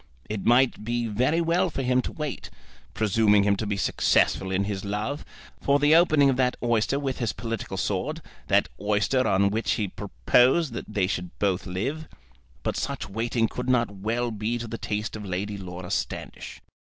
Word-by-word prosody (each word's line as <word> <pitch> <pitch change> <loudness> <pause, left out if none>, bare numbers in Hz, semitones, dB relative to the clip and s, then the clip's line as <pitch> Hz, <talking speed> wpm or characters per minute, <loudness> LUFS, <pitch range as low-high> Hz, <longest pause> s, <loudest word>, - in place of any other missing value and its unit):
It 105 -2 -4
might 120 -1 +4
be 120 +1 -1
very 125 +10 +1
well 175 +2 +2
for 135 -4 -3
him 125 0 +2
to - - -5
wait, 150 -4 -5 0.5
presuming 105 -1 +3
him 100 0 +3
to 110 - -3
be 105 -1 -1
successful 95 0 +2
in 95 +1 +1
his 100 -1 -3
love, 105 +8 -3 0.4
for 140 0 +3
the 145 +2 +4
opening 155 -4 +5
of 135 -2 +2
that 125 -1 +1
oyster 120 +3 +1
with 135 -2 -3
his 115 -4 -1
political 115 -2 -5
sword, - - -2 0.3
that - - +3
oyster 105 +5 +1
on 100 0 +3
which 110 +2 0
he 105 - -1
proposed 125 - +2
that 115 - -6
they 100 -3 +1
should 90 -2 -4
both 100 -1 0
live; 135 +13 -3 0.6
but - - -1
such - - -3
waiting 115 +2 0
could 125 +3 -5
not 120 -4 +2
well 115 +5 -2
be 110 +2 -2
to 120 - -5
the 115 +1 -6
taste 105 +1 -3
of 105 - -6
Lady 100 +2 -3
Laura 90 -1 -7
Standish. - - -4
115 Hz, 185 wpm, -26 LUFS, 100-130 Hz, 0.6 s, opening